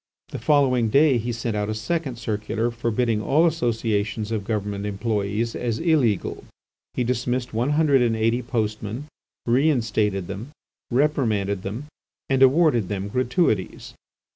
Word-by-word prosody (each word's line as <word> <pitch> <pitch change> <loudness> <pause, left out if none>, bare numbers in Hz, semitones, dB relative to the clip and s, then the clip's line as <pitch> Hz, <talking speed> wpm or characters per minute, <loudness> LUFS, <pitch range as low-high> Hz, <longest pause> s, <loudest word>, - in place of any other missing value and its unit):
The - - -6
following 130 -6 +3
day 140 0 +4
he 120 +2 -3
sent 115 -1 -3
out 105 0 -1
a 110 - -2
second 140 +3 -2
circular 110 0 -2
forbidding 115 -1 0
all 150 +9 +3
associations 115 -7 -1
of 110 -3 -1
government 105 -2 -2
employees 105 +2 -2
as 115 -2 -2
illegal. 145 - +1 0.5
He 125 - +1
dismissed 125 0 -1
one 120 +6 0
hundred 145 -4 +4
and 115 -2 +2
eighty 115 +3 +1
postmen, 110 +1 -3 0.4
reinstated 115 - +1
them, 100 +10 -7 0.4
reprimanded 115 -8 +1
them—and 130 +4 -5
awarded 135 - +4
them 100 0 -3
gratuities. 125 - 0
115 Hz, 130 wpm, -23 LUFS, 105-130 Hz, 0.5 s, day